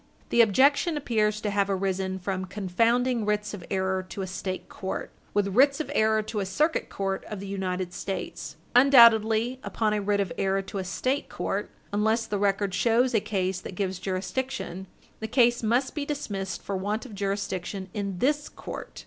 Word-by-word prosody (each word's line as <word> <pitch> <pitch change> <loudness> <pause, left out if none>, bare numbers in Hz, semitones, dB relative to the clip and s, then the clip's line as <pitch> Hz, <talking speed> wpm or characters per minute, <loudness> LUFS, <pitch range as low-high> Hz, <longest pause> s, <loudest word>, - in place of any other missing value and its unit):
The 235 - +5
objection 280 - +4
appears 215 -6 +1
to 210 - -1
have 200 0 +1
arisen 190 -1 -1
from 190 0 -3
confounding 230 +6 +1
writs 210 0 -1
of 195 -4 -7
error 190 -1 0
to 195 - -4
a - - -2
State 185 0 -4
court 190 - -5 0.2
with 205 -1 +2
writs 275 +6 +5
of 310 - -3
error 220 0 +3
to 215 0 -4
a 195 - -1
Circuit 305 - 0
Court 195 -1 -2
of 210 - -6
the 200 - -7
United 185 -2 -3
States. 195 +1 -5 0.2
Undoubtedly, 235 -2 +6
upon 215 -2 0
a 210 - 0
writ 200 0 +1
of 195 -3 -1
error 195 0 +1
to 195 +1 -5
a - - -2
State 255 +10 -1
court, - - -3 0.2
unless 220 +2 +2
the 205 -2 -2
record 200 -1 +1
shows 235 +6 +3
a 220 - +4
case 190 -3 -2
that 190 - -8
gives 190 -1 -2
jurisdiction, 190 0 -3 0.3
the 220 - -4
case 240 0 +3
must 240 +4 +1
be 295 - -2
dismissed 200 -11 -4
for 200 - -3
want 205 +6 -2
of 240 - -10
jurisdiction 195 -1 -3
in 200 -3 -3
this 290 +7 +1
court. - - -8
205 Hz, 185 wpm, -27 LUFS, 190-235 Hz, 0.3 s, Undoubtedly